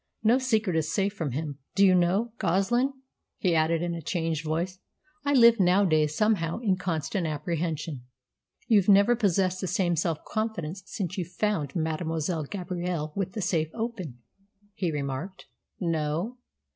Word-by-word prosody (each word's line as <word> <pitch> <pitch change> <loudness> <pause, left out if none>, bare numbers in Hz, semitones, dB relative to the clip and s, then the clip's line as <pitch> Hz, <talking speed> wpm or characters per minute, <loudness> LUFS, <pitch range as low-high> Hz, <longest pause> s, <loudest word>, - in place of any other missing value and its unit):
No 230 +4 +5
secret 220 -8 +1
is 160 -1 0
safe 200 0 0
from 160 - -3
him. 145 0 -4 0.2
Do 200 - +6
you 185 - +6
know, 185 +6 +2
Goslin," 195 +9 +2 0.5
he 180 -3 +1
added, 165 +1 +2
in 175 -1 -1
a 170 - -5
changed 165 0 -2
voice, 170 +4 -2 0.4
"I 285 0 +1
live 235 -3 +7
nowadays 175 -5 +3
somehow 210 -7 +1
in 215 -5 +1
constant 170 0 -2
apprehension." 155 -3 -3 0.6
"You've 210 -4 +4
never 200 +4 +6
possessed 190 -4 +1
the 190 - -2
same 175 -1 +1
self 165 -1 -1
confidence 200 -5 -3
since 195 -2 -4
you 180 - -1
found 180 -3 -2
Mademoiselle 160 -1 -1
Gabrielle 175 -3 -3
with 190 -2 -2
the 215 - -3
safe 160 -4 0
open," 220 - -4 0.6
he 180 -4 -1
remarked. 145 +6 -4 0.3
"No. 165 +7 -1
180 Hz, 150 wpm, -27 LUFS, 160-200 Hz, 0.6 s, live